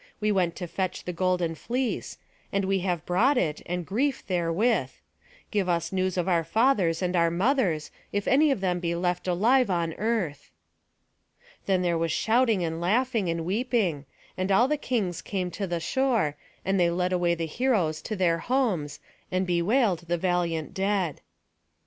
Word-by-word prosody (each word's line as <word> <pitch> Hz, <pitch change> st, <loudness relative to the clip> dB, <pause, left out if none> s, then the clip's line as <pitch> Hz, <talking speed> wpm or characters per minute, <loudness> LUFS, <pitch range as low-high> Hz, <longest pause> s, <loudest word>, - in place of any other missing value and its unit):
We 215 Hz, 0 st, +1 dB
went 180 Hz, -4 st, +1 dB
to 180 Hz, -, -5 dB
fetch 185 Hz, +2 st, -3 dB
the 180 Hz, -, -4 dB
golden 180 Hz, -1 st, 0 dB
fleece; 245 Hz, -, -3 dB, 0.3 s
and 195 Hz, -1 st, 0 dB
we 195 Hz, 0 st, +1 dB
have 175 Hz, -3 st, -2 dB
brought 245 Hz, +11 st, +3 dB
it, 155 Hz, -8 st, 0 dB
and 180 Hz, 0 st, -3 dB
grief 260 Hz, -, -1 dB
therewith. 180 Hz, +6 st, +1 dB, 0.6 s
Give 200 Hz, -4 st, 0 dB
us 170 Hz, -1 st, 0 dB
news 185 Hz, -1 st, 0 dB
of 180 Hz, 0 st, 0 dB
our 170 Hz, -3 st, +2 dB
fathers 195 Hz, -, +2 dB
and 180 Hz, 0 st, 0 dB
our 170 Hz, -1 st, +4 dB
mothers, 180 Hz, -, +1 dB, 0.2 s
if 205 Hz, 0 st, -2 dB
any 295 Hz, +4 st, +5 dB
of 270 Hz, -8 st, 0 dB
them 180 Hz, -2 st, 0 dB
be 170 Hz, -1 st, -1 dB
left 175 Hz, +1 st, -1 dB
alive 225 Hz, +7 st, +3 dB
on 170 Hz, -3 st, 0 dB
earth." 195 Hz, -10 st, -2 dB, 1.2 s
Then 185 Hz, -2 st, +2 dB
there 170 Hz, -2 st, +1 dB
was 165 Hz, -1 st, 0 dB
shouting 225 Hz, -1 st, +2 dB
and 165 Hz, 0 st, -3 dB
laughing, 225 Hz, +1 st, +1 dB
and 165 Hz, -1 st, -2 dB
weeping; 195 Hz, -, 0 dB, 0.3 s
and 185 Hz, +1 st, -1 dB
all 235 Hz, +6 st, +5 dB
the 300 Hz, -, +1 dB
kings 220 Hz, -, -2 dB
came 185 Hz, -3 st, -3 dB
to 195 Hz, +1 st, -4 dB
the 175 Hz, -1 st, -2 dB
shore, 225 Hz, -, +1 dB, 0.3 s
and 195 Hz, 0 st, +1 dB
they 175 Hz, -1 st, +4 dB
led 180 Hz, +1 st, 0 dB
away 175 Hz, -1 st, +2 dB
the 165 Hz, -1 st, -3 dB
heroes 175 Hz, -5 st, 0 dB
to 215 Hz, -, -4 dB
their 170 Hz, -3 st, +2 dB
homes, 190 Hz, -, -1 dB, 0.3 s
and 185 Hz, +1 st, +1 dB
bewailed 180 Hz, +1 st, +1 dB
the 175 Hz, +1 st, 0 dB
valiant 170 Hz, -3 st, -1 dB
dead. 195 Hz, -5 st, -1 dB
185 Hz, 175 wpm, -27 LUFS, 170-215 Hz, 1.2 s, any